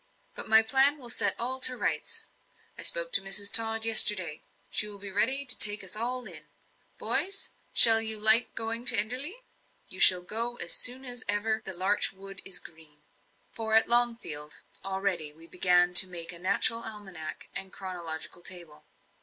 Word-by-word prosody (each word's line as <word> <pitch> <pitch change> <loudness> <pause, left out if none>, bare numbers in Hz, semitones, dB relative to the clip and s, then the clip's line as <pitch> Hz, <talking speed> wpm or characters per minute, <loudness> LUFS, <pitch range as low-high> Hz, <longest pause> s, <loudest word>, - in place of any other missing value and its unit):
"But - - -8
my 220 0 +4
plan 270 +5 +2
will 245 -4 -6
set - - 0
all 255 +2 -5
to 255 -1 0
rights. 450 - -5 0.5
I - - -11
spoke - - 0
to - - +5
Mrs. 200 +1 -1
Tod 225 0 +6
yesterday. 195 -8 +3 0.3
She 210 - 0
will 205 -1 -11
be 200 0 -9
ready 260 +8 0
to 250 - +1
take 205 -1 +6
us 190 +1 -4
all 245 +3 -4
in. 155 -6 -9 0.5
Boys, 390 +1 -2 0.2
shall 225 -1 +6
you 220 -1 +3
like 220 +3 +6
going 225 +1 -3
to 245 -2 +4
Enderley? 260 - -1 0.5
You - - -8
shall 180 -1 +7
go 230 +5 -4
as 175 -7 -3
soon 255 +2 +1
as 245 0 -3
ever 220 +2 -2
the 190 - -6
larch 190 +4 -1
wood 195 0 -10
is 190 - -6
green." 155 -2 -15 0.5
For, 220 -1 -5
at 225 - +2
Longfield, 230 -12 -2 0.2
already 190 -6 -5
we 165 +2 -15
began 180 +1 +1
to 180 +1 +7
make 170 -2 -5
a 170 - -12
natural 200 +5 0
almanack 205 -8 -9
and 190 -1 -1
chronological 175 -3 -8
table. 170 -4 -8
210 Hz, 175 wpm, -25 LUFS, 180-235 Hz, 0.5 s, shall